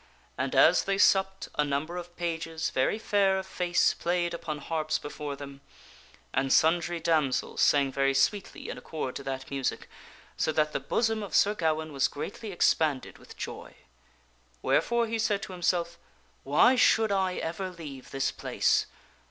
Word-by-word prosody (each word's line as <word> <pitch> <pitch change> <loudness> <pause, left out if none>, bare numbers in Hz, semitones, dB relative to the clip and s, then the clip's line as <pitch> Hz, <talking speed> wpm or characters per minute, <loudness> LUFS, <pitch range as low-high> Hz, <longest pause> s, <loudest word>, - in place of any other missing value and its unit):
And - - -2
as - - +5
they 195 0 0
supped, 190 -1 +3
a - - +5
number 145 +4 -2
of 175 0 -7
pages, 165 -2 -3
very 130 +10 +1
fair 200 -3 +2
of 190 - -4
face, 180 -2 +1
played 175 0 -1
upon 165 -3 -4
harps 155 +1 -2
before 145 -1 -6
them; 140 0 -10 0.7
and 135 0 0
sundry 170 +3 +3
and 165 - -7
tk" - - -15
damsels 155 -6 +1
sang 140 -2 +4
very 135 0 +1
sweetly 200 +8 0
in - - -6
accord 150 -5 -5
to 140 - -8
that 135 0 -5
music, 135 -2 -2 0.5
so - - +1
that 150 0 +1
the - - 0
J 135 - -21
ady - - -28
Ettard - - -30
bosom 225 -2 +1
of 200 - -5
Sir 205 - +4
Gawaine 160 -4 -1
was 135 -1 +2
greatly 200 +8 -6
expanded 155 -6 +1
with - - -15
joy. - - -7 0.9
Where - - +3
fore 235 0 0
he 225 0 -3
said 210 -2 0
to 215 - -7
himself, 170 -1 -1 0.4
"Why 150 - +4
should 225 -3 +4
I 190 -2 +1
ever 180 +4 -3
leave 150 -7 -10
this 135 0 -1
place? - - +1
165 Hz, 180 wpm, -28 LUFS, 145-190 Hz, 0.9 s, as